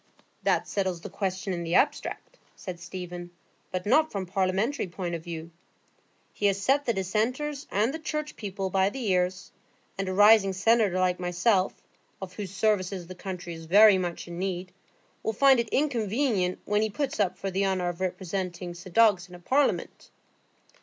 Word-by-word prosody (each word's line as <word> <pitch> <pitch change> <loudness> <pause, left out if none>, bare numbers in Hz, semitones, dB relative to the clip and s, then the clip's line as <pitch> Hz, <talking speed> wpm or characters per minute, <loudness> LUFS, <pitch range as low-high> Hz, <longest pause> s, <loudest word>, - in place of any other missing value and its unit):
"That - - +1
settles 190 -4 -2
the 205 - -8
question 190 -1 -2
in 170 -1 -3
the 170 +1 -1
abstract," - - 0 0.2
said 180 -2 -7
Stephen, 175 0 -7 0.4
"but 185 -1 -4
not 305 +8 +3
from 195 -2 -3
a 180 - -13
parliamentary 195 +6 0
point 175 0 -5
of 165 -1 -4
view. 165 -1 -7 0.8
He 205 - +1
has 195 -1 +1
set 275 +8 +2
the 235 - +1
Dissenters 250 +10 -1
and 215 +7 +1
the 320 - -4
Church 305 -1 -4
people 195 -2 -4
by 190 +1 +3
the 230 -3 -2
ears; 180 +1 0 0.5
and 195 -1 -1
a - - -2
rising 205 -1 +6
senator 205 -1 +3
like 180 -1 +1
myself, 185 +2 +1 0.4
of 190 -1 -7
whose 200 -1 -5
services 195 -2 0
the 185 - -9
country 180 -2 -6
is 165 0 -9
very 200 +3 +7
much 175 -2 -4
in 170 0 -7
need, 185 -1 -3 0.5
will 220 - -1
find 270 +3 +5
it 235 -2 -1
inconvenient 230 -7 0
when 210 0 +1
he 220 - +1
puts 270 +3 -3
up 195 -4 +1
for 195 - -4
the 195 +1 +1
honour 185 -2 0
of 175 +1 -7
representing 180 -1 -3
St 175 +2 -10
Ogg's 205 -6 +5
in 180 0 -11
Parliament." 275 +7 0
190 Hz, 180 wpm, -27 LUFS, 180-220 Hz, 0.8 s, very